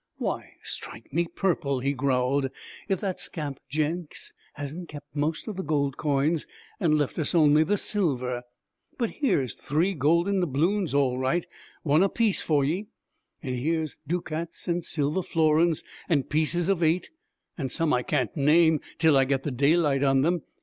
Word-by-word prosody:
'Why, -, -, -3 dB
strike 115 Hz, +4 st, -6 dB
me 170 Hz, +2 st, +1 dB
purple,' 165 Hz, -7 st, 0 dB
he 140 Hz, +2 st, 0 dB
growled, 135 Hz, 0 st, +1 dB, 0.4 s
'if 190 Hz, -2 st, +1 dB
that 190 Hz, -3 st, -2 dB
scamp 145 Hz, -5 st, -5 dB
Jenks 155 Hz, +3 st, -3 dB, 0.2 s
hasn't 150 Hz, +5 st, -6 dB
kept 145 Hz, 0 st, -11 dB
most 155 Hz, +5 st, -1 dB
of 210 Hz, -4 st, -5 dB
the 190 Hz, -, -2 dB
gold 140 Hz, -3 st, 0 dB
coins 150 Hz, +2 st, 0 dB, 0.3 s
and 155 Hz, -3 st, +3 dB
left 145 Hz, +2 st, -1 dB
us 155 Hz, +2 st, 0 dB
only 155 Hz, -1 st, +6 dB
the 205 Hz, +6 st, +1 dB
silver! 130 Hz, -, -1 dB, 0.6 s
But 235 Hz, -3 st, -1 dB
here's 185 Hz, -, 0 dB
three 165 Hz, +7 st, 0 dB
golden 170 Hz, +6 st, +2 dB
doubloons, 175 Hz, +2 st, 0 dB
all 130 Hz, -3 st, +2 dB
right, 135 Hz, +7 st, 0 dB, 0.4 s
one 150 Hz, +1 st, +4 dB
apiece 210 Hz, +1 st, +2 dB
for 145 Hz, -3 st, +2 dB
ye! 180 Hz, +9 st, -1 dB, 0.6 s
And 130 Hz, -3 st, -2 dB
here's 155 Hz, +3 st, -1 dB
ducats 165 Hz, 0 st, -3 dB
and 175 Hz, 0 st, 0 dB
silver 150 Hz, +4 st, 0 dB
florins, 160 Hz, -1 st, +2 dB, 0.3 s
and 145 Hz, -6 st, +1 dB
pieces 160 Hz, +3 st, +1 dB
of 195 Hz, -3 st, +1 dB
eight 165 Hz, +2 st, +1 dB, 0.4 s
and 135 Hz, -6 st, -4 dB
some 165 Hz, +2 st, +1 dB
I 125 Hz, -, +2 dB
can't 130 Hz, +1 st, -1 dB
name 160 Hz, +1 st, +4 dB, 0.2 s
till 160 Hz, -3 st, +4 dB
I 135 Hz, -1 st, +5 dB
get 135 Hz, 0 st, 0 dB
the 145 Hz, -, -2 dB
daylight 140 Hz, +2 st, +3 dB
on 135 Hz, -1 st, +4 dB
them. 170 Hz, +1 st, +1 dB
155 Hz, 165 wpm, -26 LUFS, 140-170 Hz, 0.6 s, only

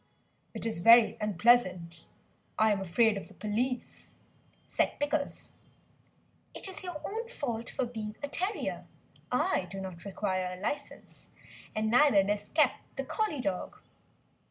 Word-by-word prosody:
"It -, -, -2 dB
is 220 Hz, -6 st, -1 dB
very 230 Hz, +4 st, +7 dB
unpleasant, 185 Hz, -5 st, +2 dB, 0.5 s
I 220 Hz, 0 st, +4 dB
am 200 Hz, -2 st, 0 dB
afraid 205 Hz, +4 st, +3 dB
of 195 Hz, -, -7 dB
the 195 Hz, -, -17 dB
police," 240 Hz, +5 st, -3 dB, 0.5 s
said -, -, 0 dB
Pickles. 290 Hz, 0 st, -2 dB, 1.0 s
"It -, -, -5 dB
is 380 Hz, -, -5 dB
your 355 Hz, -4 st, -5 dB
own 450 Hz, +3 st, -4 dB
fault 235 Hz, -, -4 dB
for 260 Hz, -, -1 dB
being 220 Hz, -3 st, -6 dB
a -, -, -1 dB
terrier; 370 Hz, +8 st, -2 dB, 0.4 s
I 250 Hz, -, +1 dB
do 195 Hz, +2 st, -6 dB
not 185 Hz, -3 st, -7 dB
require 185 Hz, -2 st, -2 dB
a -, -, -13 dB
licence, 285 Hz, +8 st, -5 dB, 0.5 s
and 215 Hz, 0 st, 0 dB
neither 250 Hz, -5 st, +6 dB
does 205 Hz, +1 st, -2 dB
Kep, 295 Hz, -5 st, +3 dB, 0.2 s
the 270 Hz, -, -3 dB
Collie 335 Hz, -, -1 dB
dog." 195 Hz, -6 st, -3 dB
225 Hz, 140 wpm, -30 LUFS, 195-280 Hz, 1.0 s, very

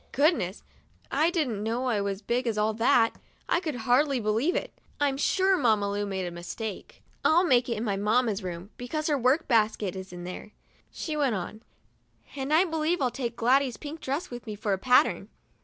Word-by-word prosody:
Goodness! 280 Hz, -, +1 dB, 0.5 s
I 310 Hz, +4 st, +3 dB
didn't 275 Hz, -, -1 dB
know 230 Hz, +4 st, -1 dB
I 225 Hz, -5 st, +1 dB
was 200 Hz, -1 st, -2 dB
as -, -, -17 dB
big 245 Hz, +3 st, -1 dB
as 220 Hz, -2 st, -1 dB
all 215 Hz, +1 st, +1 dB
that. 225 Hz, +1 st, +3 dB, 0.3 s
I -, -, +2 dB
could 315 Hz, -6 st, -4 dB
hardly 270 Hz, +2 st, +3 dB
believe 225 Hz, +10 st, +1 dB
it. -, -, -3 dB, 0.3 s
I'm 285 Hz, -2 st, +2 dB
sure 380 Hz, +7 st, +2 dB
Mamma 215 Hz, -, +2 dB
Lu 205 Hz, 0 st, -2 dB
made 190 Hz, -2 st, -3 dB
a 175 Hz, -, -4 dB
mistake. 185 Hz, +5 st, -7 dB, 0.2 s
"I'll 340 Hz, +3 st, +5 dB
make 250 Hz, -6 st, +3 dB
it 235 Hz, -, -1 dB
in 215 Hz, -, -3 dB
my 200 Hz, -4 st, -1 dB
mamma's 215 Hz, +1 st, +1 dB
room, 180 Hz, +2 st, -6 dB
because 300 Hz, +5 st, -4 dB
her 295 Hz, -2 st, +2 dB
work 260 Hz, +6 st, +2 dB
basket 215 Hz, -5 st, +1 dB
is 190 Hz, 0 st, -7 dB
in 175 Hz, 0 st, -8 dB
there," 180 Hz, +4 st, -8 dB, 0.4 s
she 310 Hz, -, -4 dB
went 280 Hz, -6 st, +1 dB
on; 200 Hz, +4 st, -6 dB, 0.7 s
"and 270 Hz, +1 st, -4 dB
I 325 Hz, +5 st, +5 dB
believe 325 Hz, +1 st, 0 dB
I'll 255 Hz, -3 st, +1 dB
take 240 Hz, -2 st, -4 dB
Gladys's 255 Hz, +2 st, +2 dB
pink 305 Hz, +1 st, -8 dB
dress 280 Hz, +4 st, -3 dB
with 240 Hz, 0 st, -8 dB
me 215 Hz, -, -4 dB
for 205 Hz, -1 st, -1 dB
a 190 Hz, -, -1 dB
pattern." 250 Hz, +5 st, +3 dB
240 Hz, 205 wpm, -27 LUFS, 210-285 Hz, 0.7 s, I'll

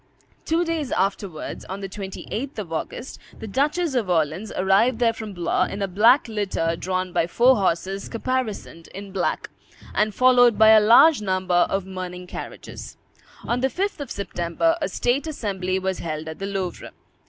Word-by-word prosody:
Two 335 Hz, +2 st, +1 dB
days 325 Hz, -5 st, -2 dB
afterwards, 190 Hz, -3 st, -2 dB
on 190 Hz, +1 st, -6 dB
the 195 Hz, -, -4 dB
28th 210 Hz, +7 st, -6 dB
of 185 Hz, -6 st, -5 dB
August, 200 Hz, +9 st, -5 dB, 0.2 s
the -, -, -8 dB
Duchess 290 Hz, -, 0 dB
of 235 Hz, -7 st, 0 dB
Orleans 165 Hz, +4 st, 0 dB
arrived 195 Hz, +6 st, +3 dB
there 230 Hz, -1 st, +2 dB
from 220 Hz, -2 st, -7 dB
Blois, 175 Hz, -2 st, 0 dB
in 200 Hz, -, -4 dB
a -, -, 0 dB
black 225 Hz, +9 st, +4 dB
litter 200 Hz, -6 st, -1 dB
drawn 185 Hz, +1 st, -3 dB
by 165 Hz, -, +1 dB
four 245 Hz, +7 st, +4 dB
horses 190 Hz, +1 st, -1 dB
caparisoned 230 Hz, -8 st, -3 dB
in 200 Hz, 0 st, -8 dB
black, 190 Hz, -2 st, -2 dB, 0.4 s
and 210 Hz, 0 st, +1 dB
followed 245 Hz, -3 st, +5 dB
by 220 Hz, +1 st, +7 dB
a 220 Hz, -1 st, +8 dB
large 235 Hz, +6 st, +6 dB
number 185 Hz, -3 st, +1 dB
of 195 Hz, -1 st, -1 dB
mourning 180 Hz, -1 st, -6 dB
carriages. -, -, -9 dB, 0.5 s
On 240 Hz, -, -1 dB
the 265 Hz, -, +2 dB
5th 390 Hz, +4 st, -2 dB
of 285 Hz, -4 st, -6 dB
September, 200 Hz, -, -1 dB
a 295 Hz, -, -1 dB
state 270 Hz, +6 st, 0 dB
assembly 190 Hz, -10 st, -2 dB
was 190 Hz, 0 st, -2 dB
held 155 Hz, -1 st, -5 dB
at 160 Hz, 0 st, -7 dB
the 195 Hz, -, -3 dB
Louvre. 195 Hz, -3 st, -4 dB
200 Hz, 170 wpm, -23 LUFS, 185-245 Hz, 0.5 s, a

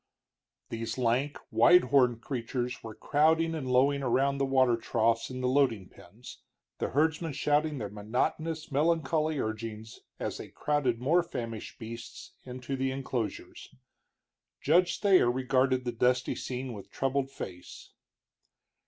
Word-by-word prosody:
These 115 Hz, +1 st, -4 dB
lank, 130 Hz, +4 st, 0 dB
wide 180 Hz, +1 st, +6 dB
horned 125 Hz, -3 st, +3 dB
creatures 125 Hz, -2 st, -3 dB
were 110 Hz, -2 st, -8 dB
crowding 160 Hz, +2 st, +2 dB
and 145 Hz, -5 st, -4 dB
lowing 140 Hz, +3 st, +3 dB
around 135 Hz, +2 st, +1 dB
the 135 Hz, -, +1 dB
water 130 Hz, -3 st, +4 dB
troughs 115 Hz, 0 st, 0 dB
in 130 Hz, 0 st, -6 dB
the 125 Hz, -, 0 dB
loading 125 Hz, -8 st, +1 dB
pens, -, -, -14 dB, 0.4 s
the -, -, -1 dB
herdsmen 160 Hz, +3 st, 0 dB
shouting 150 Hz, +2 st, +1 dB
their 110 Hz, -5 st, -3 dB
monotonous, 150 Hz, +10 st, -2 dB
melancholy 155 Hz, +1 st, +1 dB
urgings 110 Hz, -1 st, -5 dB, 0.2 s
as -, -, -3 dB
they -, -, -7 dB
crowded 140 Hz, -6 st, -1 dB
more 155 Hz, +8 st, +3 dB
famished 115 Hz, -9 st, -6 dB
beasts 115 Hz, -1 st, -9 dB
into 125 Hz, +1 st, -5 dB
the 135 Hz, 0 st, -1 dB
enclosures. 130 Hz, -5 st, -5 dB, 0.8 s
Judge 175 Hz, +4 st, +2 dB
Thayer 190 Hz, -, +5 dB
regarded 130 Hz, 0 st, +1 dB
the 120 Hz, -, -1 dB
dusty 125 Hz, +2 st, +1 dB
scene 130 Hz, 0 st, -5 dB
with 100 Hz, -3 st, -10 dB
troubled 135 Hz, 0 st, -1 dB
face. 90 Hz, -9 st, -9 dB
130 Hz, 135 wpm, -29 LUFS, 115-145 Hz, 0.8 s, wide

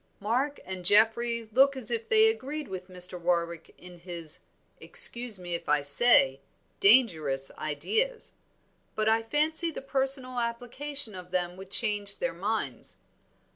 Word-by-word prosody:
"Mark 255 Hz, +8 st, -3 dB
and 185 Hz, -1 st, -7 dB
Geoffrey 225 Hz, +4 st, +3 dB
look 270 Hz, +4 st, +2 dB
as 255 Hz, -, -3 dB
if 460 Hz, -1 st, -4 dB
they 440 Hz, -1 st, +4 dB
agreed 305 Hz, -8 st, -4 dB
with 185 Hz, -2 st, -9 dB
Mr. 180 Hz, -1 st, -4 dB
Warwick 170 Hz, -1 st, -3 dB
in 180 Hz, -1 st, -14 dB
his 170 Hz, -3 st, +1 dB, 0.3 s
excuse 245 Hz, -, +4 dB
me 175 Hz, -1 st, -6 dB
if 170 Hz, -, -5 dB
I 150 Hz, 0 st, +1 dB
say, 140 Hz, -, +3 dB, 0.4 s
dangerous 160 Hz, -, +2 dB
ideas; 445 Hz, -, -3 dB, 0.6 s
but 215 Hz, 0 st, -2 dB
I 225 Hz, +1 st, +2 dB
fancy 310 Hz, +7 st, +1 dB
the 320 Hz, -, -8 dB
personal 265 Hz, -2 st, +1 dB
application 245 Hz, +2 st, -1 dB
of 180 Hz, -1 st, -11 dB
them 180 Hz, -1 st, -3 dB
would 190 Hz, 0 st, -13 dB
change 205 Hz, -1 st, +2 dB
their -, -, -4 dB
minds. -, -, -5 dB
220 Hz, 140 wpm, -26 LUFS, 180-270 Hz, 0.6 s, they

